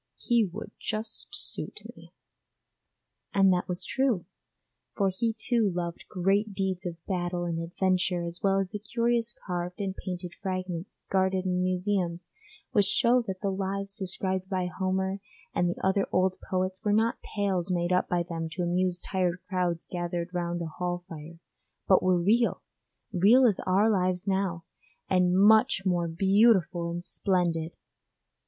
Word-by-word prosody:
'He 235 -2 +2
would 195 +3 -7
just 220 0 -4
suit 405 - -2
me.' - - -16 1.2
And 195 -1 +5
that 180 - -1
was 180 -1 -2
true, 260 -9 0 0.7
for 195 -2 +2
he 220 +4 -1
too 225 -2 +1
loved 170 -1 -4
great 195 +3 +1
deeds 190 -2 -2
of 165 -1 -8
battle 175 -1 -2
and 165 -1 -2
adventure 180 +1 0
as 170 +1 -5
well 195 -1 +3
as 195 -1 0
the 210 - -5
curious 235 +2 0
carved 180 0 -3
and 195 -2 -2
painted 180 -2 -6
fragments 185 -2 -5
guarded 190 0 +1
in 180 -1 0
museums 180 -1 -1 0.4
which 205 -2 +3
show 245 +1 +3
that 190 -1 -4
the 200 - 0
lives 195 +1 -3
described 190 -1 -1
by 185 -2 0
Homer 190 +1 -1 0.3
and 175 - +1
the 175 - -4
other 190 +1 +2
old 185 0 +2
poets 185 0 -1
were 210 - +1
not 225 +2 +2 0.2
tales 190 -3 +1
made 175 0 +1
up 180 - +1
by 175 -1 +1
them 165 -1 -4
to 180 - -2
amuse 180 +1 0
tired 180 -2 -1
crowds 180 -3 -1
gathered 175 0 -4
round 175 -1 -2
a - - -3
hall 175 +2 -3
fire, 165 +1 -9 0.5
but 190 - +6
were 185 -1 +3
real 225 +7 +2 0.5
real 215 +8 +6
as 215 -6 +3
our 195 +4 +4
lives 185 -2 +1
now, 190 -3 0 0.5
and 180 0 +3
much 215 0 +5
more 175 -2 +1
beautiful 190 -1 +3
and 175 +1 -5
splendid. 170 -4 0
185 Hz, 155 wpm, -28 LUFS, 175-200 Hz, 1.2 s, but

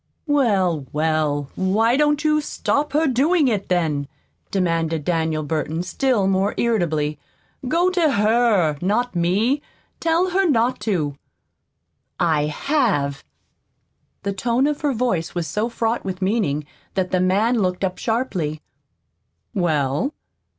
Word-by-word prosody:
"Well, 195 - +1
well, 150 -2 0
why 215 +6 +2
don't 295 +1 +2
you 305 0 +3
stop 290 0 -1
her 310 +2 +3
doing 290 +4 +3
it, 210 -5 -1
then?" 155 -6 0 0.4
demanded 165 -5 0
Daniel 160 -3 0
Burton, 155 +2 -2
still 215 +3 +1
more 195 +1 +1
irritably. 155 -10 0 0.5
"Go 345 +6 +2
to 340 -5 +2
HER, 210 -7 +3
not 215 +5 0
me. 205 +11 +1 0.4
Tell 335 +3 +1
her 380 -1 +2
not 240 -2 +2
to." 150 -8 -1 1.0
"I 155 -4 +2
have." 150 - 0 1.0
The 200 0 -1
tone 235 +6 +1
of 295 0 -1
her 295 -2 +1
voice 220 -10 -1
was 175 -2 -1
so 210 +9 -1
fraught 230 0 -1
with 185 -1 -4
meaning 185 -8 0 0.3
that 185 -1 -1
the 185 - +2
man 210 +6 +2
looked 185 -1 -1
up 185 -1 -2
sharply. 190 - -1 0.9
"Well?" 160 - 0
195 Hz, 130 wpm, -21 LUFS, 160-250 Hz, 1.0 s, you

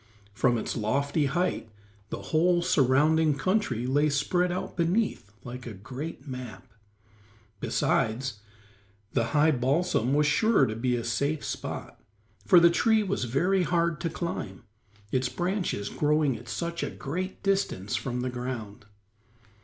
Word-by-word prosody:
From 120 +3 +2
its 110 - -3
lofty 140 +7 0
height 170 -6 -1 0.4
the - - -4
whole 175 +2 +3
surrounding 155 -1 +3
country 185 - 0
lay 145 +4 +2
spread 175 +5 +1
out 180 - -4
beneath 175 - 0
like 125 0 -8
a 110 - -6
great 130 - -7
map. 125 -3 -7 0.9
Besides, 115 0 0 0.7
the 115 - +2
high 155 +2 +5
balsam 135 0 +1
was 150 0 +3
sure 200 +2 +4
to 110 -3 -3
be 125 +2 0
a 120 - -2
safe 140 +6 -1
spot, - - -6 0.5
for 180 - +8
the 170 0 +6
tree 220 +4 +3
was 195 -9 -1
very 180 +11 +2
hard 170 -1 +1
to 170 - -1
climb, 160 - -5 0.5
its 130 -1 +1
branches 180 - -2
growing 150 -3 +1
at 120 +1 -10
such 170 +3 -3
a - - -2
great 185 +7 -5
distance 195 - 0
from 125 +2 -2
the 125 0 -2
ground. 120 -4 -6
145 Hz, 140 wpm, -28 LUFS, 125-175 Hz, 0.9 s, for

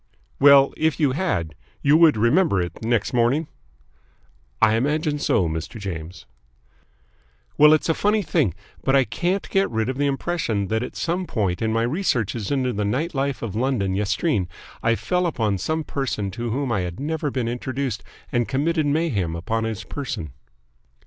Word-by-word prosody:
"Well, 140 -1 +7
if 160 0 +1
you 145 -4 +3
had, 130 - -1 0.3
you 145 +2 +5
would 160 -5 +6
remember 120 - +3
it 90 +4 -4
next 115 -1 0
morning?" 125 +6 +2 1.1
"I 110 - +5
imagine 150 +5 0
so, 90 -10 +2
Mr. 80 +8 -5
James." 90 -3 -6 1.3
"Well, 150 0 +7
it's 155 - +3
a 165 - +3
funny 210 +4 +1
thing, 145 - +1 0.3
but 135 - +2
I 135 - +5
can't 175 - -2
get 195 0 +2
rid 110 +1 -1
of 130 +1 -3
the 145 - +2
impression 135 - -1
that 110 0 0
at 125 - -6
some 175 +2 -2
point 95 -6 -1
in 110 0 +1
my 115 +1 +1
researches 120 - -1
into 130 -3 0
the 105 - -1
night 130 +12 -1
life 135 -2 -2
of 110 -5 -4
London 115 -6 0
yestreen 105 - 0 0.3
I 115 0 +2
fell 180 +7 0
upon 110 - -1
some 160 - -1
person 125 -10 -3
to 120 +3 -4
whom 130 +2 -1
I 115 - +1
had 90 -1 -4
never 150 +1 -2
been 130 -3 -2
introduced 125 -1 -3 0.3
and 120 -1 +1
committed 155 +3 0
mayhem 130 - 0
upon 110 +7 -2
his 110 -4 -4
person." 90 - -5
125 Hz, 170 wpm, -23 LUFS, 105-150 Hz, 1.3 s, Well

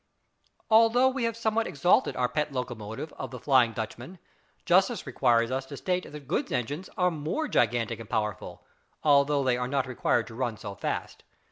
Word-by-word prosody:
Although 230 +3 +6
we 260 -2 -2
have 230 -1 -2
somewhat 225 0 0
exalted 175 - +2
our 125 -1 +1
pet 150 +4 -2
locomotive 120 +1 -5
of 130 - -4
the 125 - -8
"Flying 125 -2 +3
Dutchman," 120 - -6 0.5
justice - - +3
requires 115 0 +2
us 130 +1 -1
to 140 - -8
state 180 +6 -2
that 150 -3 -10
goods - - -1
engines 145 +9 -3
are 180 -1 +3
more 160 - -2
gigantic 120 - +1
and 115 - -10
powerful, 105 -3 -3 0.4
though 140 -1 +4
they 125 -2 +2
are 125 0 -2
not 135 0 0
required 120 -2 0
to 115 - -11
run 120 -2 -2
so 100 -1 -7
fast. - - -4
135 Hz, 175 wpm, -28 LUFS, 120-175 Hz, 0.5 s, Although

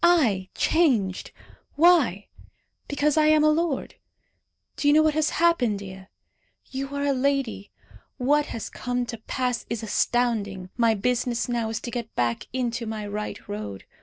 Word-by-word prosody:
I 235 - +3
changed! 235 - +1 0.4
Why? 290 - +4 0.6
Because 290 +1 +1
I 305 0 +5
am 310 0 +5
a 305 - +5
lord. 315 -3 -1 0.8
Do 290 - -1
you 290 - +6
know 310 - +6
what 310 -1 +3
has 310 0 +1
happened, 305 -11 +2
Dea? 190 -1 -9 0.6
You 270 +1 -4
are 280 - -1
a 285 -1 +2
lady. 265 -6 -1 0.5
What 290 +3 +2
has 225 - -6
come 245 -1 -2
to 230 -1 -7
pass 250 +2 -2
is 230 -1 -3
astounding. 210 -4 0
My 230 -2 +3
business 245 +2 0
now 235 -2 -1
is 225 - -3
to 240 - -6
get 235 -2 -5
back 120 -1 -1
into 240 -2 -2
my 215 -1 -4
right 210 +1 -5
road. 100 -2 -6
245 Hz, 160 wpm, -25 LUFS, 210-290 Hz, 0.8 s, you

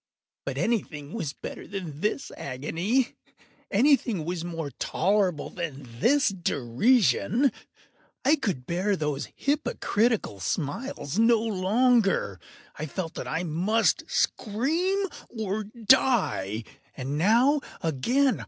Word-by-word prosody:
But 135 -1 -3
anything 160 -6 -2
was 165 -11 -3
better - - -8
than 180 -7 -6
this 210 - -1
agony! 170 - -1 0.6
Anything 235 - +3
was 175 0 -3
more 165 -4 -4
tolerable 185 -4 +1
than 145 -6 -5
this 280 - +4
derision! 200 - +2 0.7
I 300 +4 +5
could 175 - -2
bear 185 +6 0
those 150 -4 -2
hypocritical 230 - 0
smiles 145 - -3
no 230 +1 +6
longer! 215 - +2 0.4
I 155 - -3
felt 165 +2 -4
that - - -6
I 160 +3 -1
must 185 +8 +1
scream 325 - 0 0.2
or 215 -2 -3
die! 215 - +2 0.3
and 135 +2 -3
now—again! 245 - +2
195 Hz, 105 wpm, -27 LUFS, 155-240 Hz, 0.7 s, no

